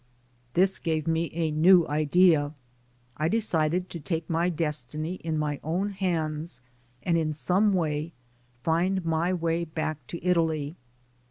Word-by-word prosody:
This 190 +2 +4
gave 160 -2 -1
me 165 0 0
a 160 -1 -1
new 170 +3 +5
idea. 155 0 +3 0.6
I 155 - +1
decided 180 -4 +1
to 170 - -5
take 160 +1 -3
my 170 +2 +1
destiny 155 +1 -3
in 160 -1 -1
my 150 -2 -1
own 180 +6 -1
hands 165 -4 -2 0.4
and 170 -2 +2
in 155 -1 -1
some 185 +7 +2
way 160 -3 -1 0.5
find 175 +3 +1
my 165 +2 +1
way 170 -1 0
back 155 -4 -4
to 170 0 -7
Italy. 160 -4 +1
165 Hz, 140 wpm, -27 LUFS, 155-180 Hz, 0.6 s, new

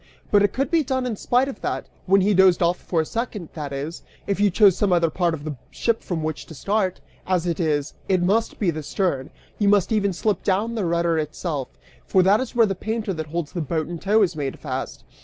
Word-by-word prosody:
But 205 - +5
it 205 -1 +3
could 270 0 -2
be 335 -2 +4
done 260 -1 -1
in 240 -3 -2
spite 250 +5 +1
of 275 - -7
that, - - -2 0.2
when 195 +1 +5
he 205 +2 +3
dozed 185 -2 +5
off 175 +1 +2
for 165 -3 0
a - - -3
second, 215 -4 -4
that 150 -3 -5
is, 145 +5 -5 0.2
if 200 -1 -1
you 205 0 +4
chose 195 0 +5
some 205 -2 +1
other 170 -2 +3
part 175 -1 +1
of 145 - -10
the 155 -1 -4
ship 230 -1 0
from 165 -4 -3
which 155 -1 -4
to 160 - -10
start: 195 +3 0 0.3
as 180 -2 +1
it 170 -1 -1
is, 150 -3 0 0.2
it 185 -2 +3
must 215 +5 +1
be 190 -5 +1
the 155 -1 -5
stern, 150 -3 -1 0.3
you 205 -1 +3
must 205 +1 +3
even 205 -2 +2
slip 195 +1 -1
down 205 +4 0
the 215 -5 -1
rudder 170 -1 +1
itself, 150 -2 -3 0.4
for 190 -2 +3
that 195 +3 +5
is 260 -2 -4
where 230 -2 +6
the 195 - -1
painter 220 +1 -3
that 160 -2 -5
holds 160 -1 -3
the 175 - -3
boat 155 +1 -2
in 170 0 -6
tow 210 +4 +3
is 175 -3 0
made 140 -3 -3
fast. - - -5
185 Hz, 245 wpm, -23 LUFS, 160-210 Hz, 0.4 s, where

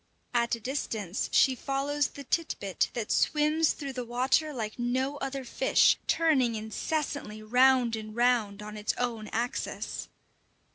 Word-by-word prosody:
At 235 -1 +2
a - - -11
distance 220 -6 -3
she 265 - +5
follows 275 +2 -1
the 280 - -10
tit 325 +5 -1
bit 195 -2 -1
that 230 -3 -3
swims 305 +1 +2
through 280 -3 -6
the 250 -1 -4
water 255 +6 +1
like 220 -4 -5
no 260 +4 0
other 270 -1 -4
fish, - - +4
turning 270 -8 +3
incessantly 220 0 -3
round 250 +1 +4
and 215 -1 -7
round 230 -4 +1
on 210 0 -8
its 210 0 -1
own 230 -3 -2
axis. 240 +3 -3
245 Hz, 145 wpm, -29 LUFS, 220-280 Hz, -, she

